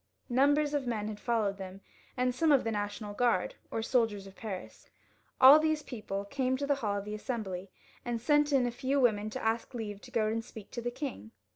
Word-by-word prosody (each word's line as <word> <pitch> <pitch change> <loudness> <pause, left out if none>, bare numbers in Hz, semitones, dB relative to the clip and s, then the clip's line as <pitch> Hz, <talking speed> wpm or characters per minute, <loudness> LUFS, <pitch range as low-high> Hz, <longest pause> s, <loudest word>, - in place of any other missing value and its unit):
Numbers 285 +4 +3
of 280 -3 -1
men 215 -3 -1
had 210 -1 -6
followed 210 -5 0
them, 190 0 -8 0.4
and 250 0 +1
some 310 +5 +2
of 275 -3 +5
the 225 - -1
National 205 0 -3
Guard, 245 - +1 0.2
or 225 - -2
the - - -4
soldiers 225 -5 +1
of 195 0 -12
Paris. 200 -5 -7 0.5
All 270 +4 +10
these 310 -1 +1
people 200 -5 -5
came 260 +3 0
to 285 - -2
the 285 - +3
hall 205 -3 0
of 200 - -5
the 210 - -5
Assembly, 205 -5 -4 0.3
and 240 -1 -2
sent 295 +4 +3
in 265 -3 +4
a 245 - 0
few 265 +3 0
women 215 -4 +2
to - - -6
ask 225 +1 0
for 250 - -7
leave 205 -3 -5
to - - -12
go 230 -4 +1
and 225 +1 -1
speak 215 -2 -11
to 240 - -4
the 240 - -1
king. 240 -3 -6
235 Hz, 230 wpm, -31 LUFS, 210-260 Hz, 0.5 s, All